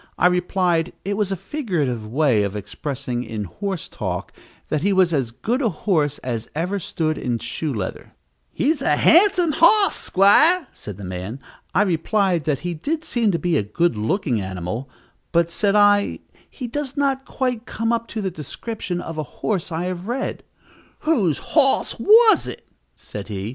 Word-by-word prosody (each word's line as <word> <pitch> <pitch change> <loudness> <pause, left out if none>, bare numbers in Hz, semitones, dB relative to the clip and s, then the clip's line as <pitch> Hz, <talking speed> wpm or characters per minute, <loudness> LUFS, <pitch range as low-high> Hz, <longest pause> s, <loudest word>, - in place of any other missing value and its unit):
I - - +2
replied, 180 -1 +1
it 200 +1 -1
was 200 -2 -1
a - - 0
figurative 175 - -3
way 130 -2 +2
of 100 0 -2
expressing, 125 +3 -4
in 110 -3 -5
horse 190 - -5
talk, - - -5 0.4
that 155 - 0
he 200 +4 +2
was 185 -3 +3
as 135 -6 0
good 230 - -2
a 235 - +2
horse 155 -5 0
as 115 -3 -4
ever 180 +6 -1
stood 155 -3 -2
in 120 -2 -1
shoe 150 +6 -4
leather. 105 -7 -5 0.4
"He's 300 +3 0
a - - +2
handsome 360 -1 +5
hos, 400 +5 +6
'squire," 305 - +4
said 105 -3 -9
the 100 - -9
man. 95 +7 -6 0.4
I 200 - +5
replied 180 -2 0
that 145 -4 0
he 175 0 -3
did 300 - -3
seem 235 -7 0
to 175 - +1
be 175 -2 0
a - - +2
good 115 +10 0
looking 120 - -1
animal; 95 +7 -5 0.4
but, 170 -1 +2
said 200 +3 +1
I, 205 -1 +4 0.3
"he 255 - -7
does 275 +3 -4
not 275 -1 +1
quite 250 -5 -3
come 230 +1 -1
up 230 0 -2
to 225 - -5
the 190 - -1
description 175 - -5
of 165 -1 -6
a 150 - -8
horse 185 -5 -1
I 165 +2 -2
have 180 +1 -4
read." 255 +3 -3 0.6
"Whose 215 - +2
hos 275 -4 +4
was 445 +1 +6
it?" - - -8 0.3
said 100 -1 -8
he. 100 -1 -4
180 Hz, 175 wpm, -22 LUFS, 135-230 Hz, 0.6 s, hos